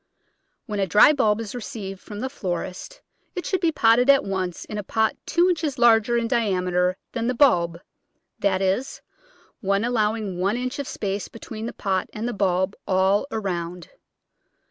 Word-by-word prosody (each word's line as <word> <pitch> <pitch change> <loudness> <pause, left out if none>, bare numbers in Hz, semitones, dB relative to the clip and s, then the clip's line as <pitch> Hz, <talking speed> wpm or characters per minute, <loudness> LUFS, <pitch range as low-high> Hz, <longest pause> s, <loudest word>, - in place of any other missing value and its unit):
When 210 -1 -4
a 195 - +1
dry 210 - +7
bulb 220 -7 +2
is 215 -3 -6
received 215 -6 -6
from 205 +2 -8
the 260 - -2
florist 185 - -5 0.3
it 360 - -4
should 375 -2 -1
be 335 -2 +3
potted 240 -1 +4
at 275 -1 +6
once 185 -3 -3
in 210 - -5
a - - -4
pot 220 +2 0
two 345 +2 +3
inches 315 -6 -1
larger 235 -1 +4
in 235 -1 0
diameter 180 -5 +1
than 230 -1 -2
the 250 - 0
bulb, 170 -11 +3 0.6
that 195 -1 +1
is, 195 +9 -1 0.6
one 200 +2 0
allowing 215 -5 -1
one 200 +5 +1
inch 255 +2 -3
of 280 - -3
space 200 0 -3
between 225 0 -7
the - - -4
pot 190 -3 -1
and 220 +2 -3
the 245 - -2
bulb 190 0 0
all 190 +4 +2
around. 180 - -4
210 Hz, 170 wpm, -24 LUFS, 190-240 Hz, 0.6 s, dry